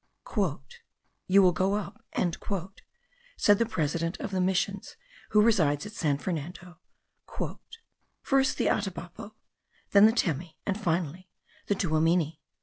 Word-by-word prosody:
"You 195 +1 +6
will 180 - +6
go 190 +4 +1
up," 210 +1 -5 1.3
said 205 -1 +4
the 230 - +2
president 165 -3 -2
of - - -5
the 185 -1 0
missions, 190 +1 -1 0.3
who 210 0 +5
resides 170 -9 +2
at 210 - -7
San 150 -10 0
Fernando, 175 +2 -6 1.4
"first 270 -1 +2
the - - 0
Atabapo, 200 +2 -3 0.6
then 200 +1 +8
the - - +4
Temi, 165 - -2
and 200 +2 -2
finally, 175 0 -2 0.4
the 205 - +2
Tuamini. 165 -2 +1
185 Hz, 120 wpm, -28 LUFS, 165-205 Hz, 1.4 s, then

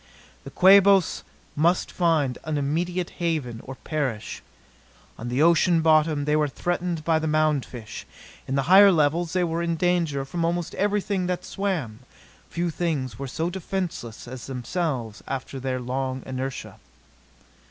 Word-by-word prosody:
The - - -6
Quabos 195 -1 +5 0.3
must 170 +4 +2
find 155 -8 +1
an 155 -1 -2
immediate 170 +5 -1
haven 150 -9 -2
or 135 - -8
perish. 135 -8 -4 0.8
On 120 - -5
the 130 +5 +2
ocean 170 0 +4
bottom 155 -2 +3
they 150 +1 +2
were 150 -1 +2
threatened 175 +2 -2
by 160 -1 +3
the 160 - -2
mound 155 -3 +2
fish. 115 -4 -9 0.4
In 135 - -1
the 135 - +1
higher 195 +5 +8
levels 165 +1 +1
they 185 -1 +2
were 165 0 -1
in 170 -1 0
danger 165 -5 0
from 165 +5 -3
almost 170 0 -1
everything 200 -2 0
that 180 0 -3
swam: 165 - -3 0.5
few 170 0 -2
things 150 -8 -2
were 140 - -4
so 165 +6 -2
defenceless 175 - -5
as 125 0 -8
themselves 125 - -3
after 135 0 -5
their 130 0 -2
long 130 +1 -3
inertia. 130 0 -5
155 Hz, 150 wpm, -25 LUFS, 135-175 Hz, 0.8 s, higher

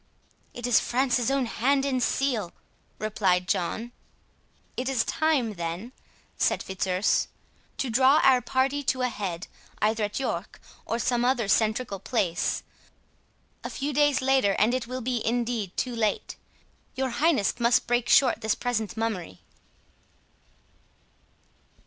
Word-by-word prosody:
"It 240 - -5
is 245 - +5
France's 250 -1 +1
own 275 -1 +1
hand 270 +4 +1
and 260 -2 0
seal," 240 -10 0 0.4
replied 195 -4 +1
Prince 180 - -2
John. 220 +7 -4 0.8
"It 255 +1 -2
is 255 -4 +1
time, 290 -8 +1
then," 170 +6 -5 0.5
said - - +1
Fitzurse, 190 0 0 0.5
"to 265 - -2
draw 265 +5 +5
our 260 -2 +5
party 265 +3 0
to 260 -2 0
a 250 - +2
head, 195 -5 -4 0.3
either 215 0 +1
at 205 - -4
York, 270 - -4 0.3
or 230 - -1
some 240 0 0
other 245 -2 +2
centrical 215 0 0
place. 185 -9 0 1.0
A - - -4
few 285 +2 -3
days 290 -1 +3
later, 265 -7 +3
and 220 +4 +3
it 255 -2 -2
will 255 +1 -5
be 245 -1 -2
indeed 230 -4 -2
too 250 -2 -2
late. 215 -3 -1 0.6
Your 265 0 -1
highness 285 -6 +1
must 235 0 +3
break 240 0 0
short 260 -4 +4
this 220 -1 +1
present 225 -4 -2
mummery." 195 - -3
240 Hz, 135 wpm, -26 LUFS, 210-260 Hz, 1.0 s, is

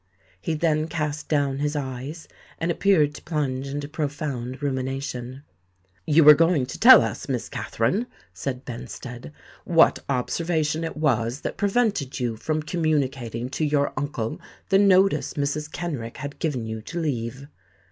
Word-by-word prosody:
He 160 - -1
then 155 -1 +1
cast 150 -2 -3
down 140 -3 +1
his 150 +1 -1
eyes, 140 +3 -5 0.3
and 165 +1 0
appeared 165 -5 +3
to - - -10
plunge 140 -5 -2
into 145 +1 -4
profound 145 -4 -4
rumination. 130 -1 -3 0.6
"You 155 +2 +5
were 150 +1 +11
going 165 -3 +3
to 125 - -8
tell 250 0 +9
us, - - -4
Miss 125 -3 -2
Katherine," 195 - -1 0.3
said 125 +8 -5
Benstead, 125 +1 -8 0.3
"what 165 -1 +4
observation 155 +4 0
it 165 - -4
was 125 -4 0
that - - -4
prevented 200 - 0
you 120 -3 -1
from 155 +7 -2
communicating 135 -8 -1
to 150 - -2
your 145 -1 +1
uncle 140 -6 -3 0.3
the 195 -1 +5
notice 195 -2 +4
Mrs. 150 +1 -2
Kenrick 140 -10 -5
had 145 -1 -7
given 135 -8 -1
you 110 0 -5
to 170 +10 -5
leave." 135 -4 -3
145 Hz, 145 wpm, -24 LUFS, 130-160 Hz, 0.6 s, were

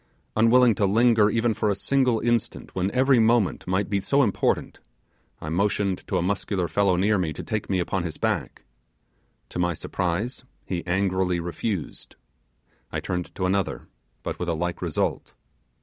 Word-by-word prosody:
Unwilling 115 +2 +5
to 100 0 +1
linger 110 0 +4
even 115 +1 +1
for 105 - 0
a 100 - +1
single 125 +2 +1
instant 120 -1 -1
when 95 +1 0
every 130 +2 +3
moment 115 -3 +2
might 95 +2 0
be 100 -1 0
so 140 +8 +3
important, 105 -6 0 0.6
I 75 - -6
motioned 100 +2 0
to 95 - 0
a 85 - 0
muscular 95 -1 -1
fellow 100 0 +2
near 100 +3 +2
me 80 -4 -1
to - - -7
take 110 -2 -3
me 95 - +1
upon 90 +1 -1
his 85 -3 -5
back; - - -2 0.9
to - - -5
my 85 -1 +1
surprise 90 - -3 0.2
he 90 -2 -3
angrily 95 -1 +1
refused. 85 +1 -4 0.8
I - - -2
turned 90 -1 -4
to 90 - -1
another, 95 0 0 0.4
but - - -4
with 90 - -2
a 85 - 0
like 85 +2 -3
result. 85 -4 -2
100 Hz, 165 wpm, -25 LUFS, 90-110 Hz, 0.9 s, Unwilling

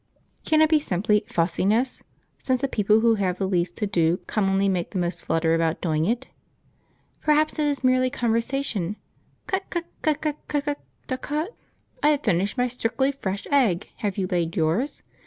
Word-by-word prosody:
Can 310 -1 +4
it 310 - +3
be 310 - +6
simply 210 -4 +1
"fussiness"; 200 +9 +1 0.4
since 260 -1 +1
the 275 - 0
people 215 -2 +3
who 230 0 +5
have 180 -2 0
the 195 - -1
least 180 -2 0
to 210 - 0
do 170 -3 +2
commonly 195 -1 +1
make 180 -3 0
the 195 - -5
most 175 0 -2
flutter 165 0 +1
about 165 0 +1
doing 155 -2 0
it? 240 +6 -1 0.9
Perhaps 305 +1 +2
it 300 - +2
is 285 -2 -1
merely 255 0 +3
conversation. 230 -5 -1 0.5
"Cut 385 0 -2
cut 345 -1 -2 0.2
cut 305 -2 +1
cut 300 -1 -2
cut 290 -1 -1 0.4
DAH_cut_!... 295 +6 -2 0.5
I 295 - +5
have 295 -1 +1
finished 200 +2 +1
my 250 0 +2
strictly 250 +3 0
fresh 200 -8 -4
egg, 225 -11 +2
have 205 -2 -2
you 190 - 0
laid 170 -2 -1
yours? 170 - 0
220 Hz, 175 wpm, -25 LUFS, 180-275 Hz, 0.9 s, be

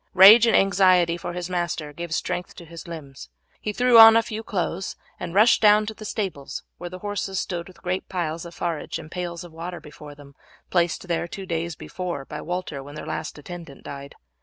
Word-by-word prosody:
Rage 210 +5 +9
and - - +4
anxiety 185 -3 +4
for 175 0 -6
his 175 0 -4
master 170 -4 -3
gave 170 +2 -7
strength 180 +2 -3
to 175 - -11
his 165 +1 -10
limbs. 140 - -9 0.3
He 210 - -3
threw 245 +1 +5
on 225 0 +10
a 230 - +3
few 220 -1 -5
clothes 190 -3 -3 0.2
and 170 - -6
rushed 215 +4 +5
down 210 0 +6
to 220 - -5
the 215 - -11
stables, 190 -10 -4 0.2
where 175 +1 -6
the 185 - -8
horses 200 -2 -2
stood 170 -2 -4
with 180 -2 -17
great 180 +1 -3
piles 170 -3 -3
of 170 0 -10
forage 170 -3 -3
and 155 - -11
pails 175 -1 -5
of 175 - -12
water 170 +2 -6
before 150 -1 -12
them, 140 -1 -15 0.4
placed 175 +1 +1
there 170 0 -1
two 195 +2 -7
days 170 -1 -3
before, 175 -6 -5
by 150 +1 -7
Walter 175 -5 -4
when 145 +2 -11
their 150 - -7
last - - -5
attendant 165 -2 -10
died. 140 0 -9
175 Hz, 210 wpm, -24 LUFS, 165-190 Hz, 0.4 s, on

